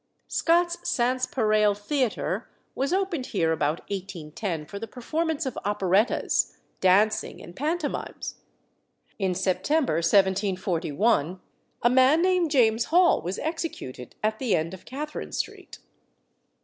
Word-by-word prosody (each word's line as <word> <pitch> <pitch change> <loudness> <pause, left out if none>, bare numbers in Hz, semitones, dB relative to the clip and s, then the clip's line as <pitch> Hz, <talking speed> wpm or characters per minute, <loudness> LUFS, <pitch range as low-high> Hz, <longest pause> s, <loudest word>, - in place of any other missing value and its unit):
Scott's 345 +1 +2
Sanspareil 230 -4 +2
Theatre 250 +3 -1 0.2
was 275 +2 -1
opened 365 -8 -1
here 165 -5 +1
about 150 0 0
1810 180 -3 -5
for 200 +6 -7
the 225 - -6
performance 315 +6 -2
of 265 - -3
operettas, 205 +2 +1 0.2
dancing, 205 +4 +2
and 175 - -12
pantomimes. 310 +2 -3 0.8
In 190 -2 0
September 200 - +1
1741 185 -1 +1 0.4
a 240 - +6
man 260 +5 +5
named 365 -3 +2
James 235 -5 +3
Hall 350 +2 +4
was 180 +4 -4
executed 315 - -5
at 215 0 0
the 235 -8 +1
end 165 +2 -2
of 190 - -11
Catherine 300 +4 -6
Street. - - -5
215 Hz, 115 wpm, -26 LUFS, 185-290 Hz, 0.8 s, a